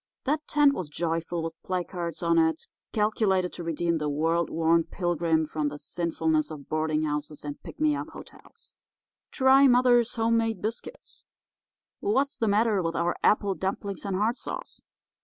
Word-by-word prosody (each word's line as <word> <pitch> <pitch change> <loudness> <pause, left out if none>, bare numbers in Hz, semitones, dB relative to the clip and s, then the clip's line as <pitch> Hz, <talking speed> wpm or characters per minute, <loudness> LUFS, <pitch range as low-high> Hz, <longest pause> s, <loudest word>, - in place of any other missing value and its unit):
That 300 +3 -1
tent 290 -2 +4
was 180 - -4
joyful 165 +1 -2
with 165 0 -6
placards 175 -3 -4
on 170 0 +3
it 160 -1 +1 0.3
calculated 205 -4 +1
to 175 - -7
redeem 170 0 -1
the 150 -1 -1
world 165 +3 0
worn 165 +1 +2
pilgrim 170 -2 0
from 155 -1 -2
the 145 0 -5
sinfulness 160 -1 -1
of 150 -3 -9
boarding 155 0 0
houses 150 0 -4
and 145 -1 -6
pick - - -11
me 305 -1 +3
up - - -5
hotels. - - -14 0.5
'Try 270 +1 +5
Mother's 245 -2 +4
Home 230 0 +2
Made 225 -1 0
Biscuits,' 230 - -6 0.8
'What's 280 -9 0
the 225 - +1
Matter 210 -1 +2
with 165 -1 -2
Our 170 +1 0
Apple 205 -2 +3
Dumplings 195 +1 -4
and 200 -2 -2
Hard 220 +6 +1
Sauce? - - -6
175 Hz, 160 wpm, -27 LUFS, 160-225 Hz, 0.8 s, Try